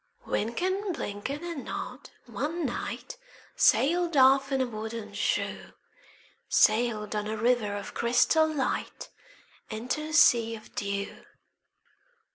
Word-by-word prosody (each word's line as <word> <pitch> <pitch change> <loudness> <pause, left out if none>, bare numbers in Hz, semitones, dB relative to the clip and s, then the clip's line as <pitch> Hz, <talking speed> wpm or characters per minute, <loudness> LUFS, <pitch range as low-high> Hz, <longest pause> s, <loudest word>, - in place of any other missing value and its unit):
Wynken, 370 - -1
Blynken, 260 +10 -5
and 335 -5 -5
Nod - - -6 0.2
one 295 +9 -3
night 255 - -5 0.4
Sailed 335 +2 +3
off 270 +1 +5
in 270 - +1
a 260 - +2
wooden 220 -2 -6
shoe,— 205 - -2 0.8
Sailed 215 -1 +2
on 210 0 -2
a 220 +1 -3
river 225 -2 +1
of 200 -1 -6
crystal 315 +7 +3
light 280 -4 -3 0.6
Into 240 +7 -3
a 310 +1 -6
sea 235 -6 +5
of 215 - -14
dew. 200 0 -4
240 Hz, 115 wpm, -28 LUFS, 215-300 Hz, 0.8 s, off